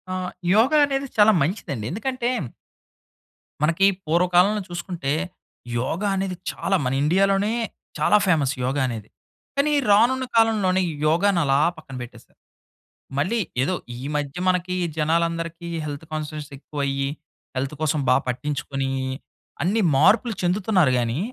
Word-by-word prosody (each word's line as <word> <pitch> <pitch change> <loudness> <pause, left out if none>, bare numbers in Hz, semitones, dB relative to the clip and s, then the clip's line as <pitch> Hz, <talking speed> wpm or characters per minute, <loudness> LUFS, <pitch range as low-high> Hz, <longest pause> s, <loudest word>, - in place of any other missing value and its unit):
ఆహ్, 185 0 -3 0.2
యోగ 225 +7 +4
అనేది 275 -1 -2
చాలా 215 +1 +7
మంచిదండి. 140 - -2
ఎందుకంటే... 245 +4 -2 1.3
మనకి 170 +5 +3 0.2
పూర్వకాలంలో 180 +5 +3
చూసుకుంటే 175 -5 -3 0.7
యోగ 135 +9 -2
అనేది 190 -1 -2 0.2
చాలా 195 - -1
మన 125 - 0
ఇండియాలోనే 195 +6 +2 0.4
చాలా 210 - +4
ఫేమస్ 150 -7 +2
యోగ 130 +3 -1
అనేది. 110 -4 -6 0.5
కానీ 280 +2 +2 0.2
రానున్న 245 +6 +4
కాలంలోనీ 210 -5 +3
ఈ - - -3 0.2
యోగాను 175 +4 +3
అలా 135 0 +3 0.2
పక్కన 145 -4 -10
పెట్టేసారు. 120 - -12 0.8
మళ్ళీ 185 +12 +1 0.2
ఏదో 165 - 0 0.2
ఈ - - -8
మధ్య 145 0 -3
మనకి 180 0 +1 0.2
జనాలందరికి 165 +2 -1 0.2
హెల్త్ 145 +1 -6
కాన్షియస్ 155 -1 -5
ఎక్కువయ్యి 140 -1 -2 0.5
హెల్త్ 135 +3 -2
కోసం 155 -1 +1
బా - - +6
పట్టించుకుని 135 +1 -2 0.7
అన్ని 205 +6 +1
మార్పులు 215 - +4
చెందుతున్నారు 180 -5 +2
గాని 120 +3 -1
170 Hz, 120 wpm, -23 LUFS, 145-200 Hz, 1.3 s, చాలా